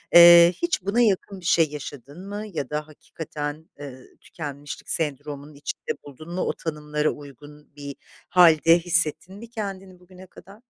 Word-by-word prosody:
Eee, 170 0 +9
hiç 345 - 0
buna 200 +6 +1
yakın 200 -3 0
bir 180 - -14
şey 165 -3 +3
yaşadın 145 +4 -9
mı 205 +1 -5
ya 140 -5 -4
da 150 0 -4
hakikaten, 155 0 -7
eee, 130 -3 -9 0.2
tükenmişlik 145 -3 -8
sendromunun 145 -1 -3
içinde 145 0 -5
buldun 155 +4 -11
mu, 185 - -2
o - - -1
tanımlara 150 -1 -2
uygun 145 +1 -12
bir 140 -1 -8 0.3
hâlde 165 -1 +6
hissettin 170 +1 +1
mi 225 +3 -11
kendini 195 -5 -7
bugüne 185 +1 -15
kadar? 195 +5 -16
160 Hz, 150 wpm, -24 LUFS, 145-185 Hz, 0.3 s, Eee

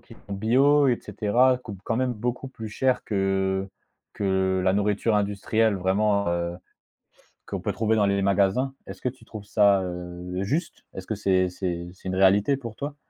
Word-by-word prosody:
qui - - -15
sont 100 - -7
bio 135 +8 +4
et 120 - +2
cetera 120 +5 +2
coûtent 105 -6 -9
quand 115 - -1
même 130 -1 0
beaucoup 125 +4 -3
plus 115 -4 -8
cher 130 +4 0
que 95 -1 0 0.5
que 95 -1 +1
la 95 - +3
nourriture 105 +2 +1
industrielle 105 +1 +1
vraiment, 100 +1 +1
heu, 85 0 -2 0.9
qu'on - - -4
peut - - -2
trouver 110 0 +1
dans 105 -2 +3
les 100 0 +1
magasins. 100 +7 +2
Est-ce - - -9
que 125 - +1
tu 125 -2 -10
trouves 110 -2 -9
ça, 100 -2 +4
heu, 90 +1 -5
juste? 155 - -3
Est-ce 95 - -7
que 110 - -2
c'est 95 -2 +2
c'est 90 -1 -4
c'est 95 0 -10
une 95 - -2
réalité 100 +8 +4
pour 115 -5 -8
toi? 145 +1 -5
100 Hz, 185 wpm, -25 LUFS, 95-115 Hz, 0.9 s, bio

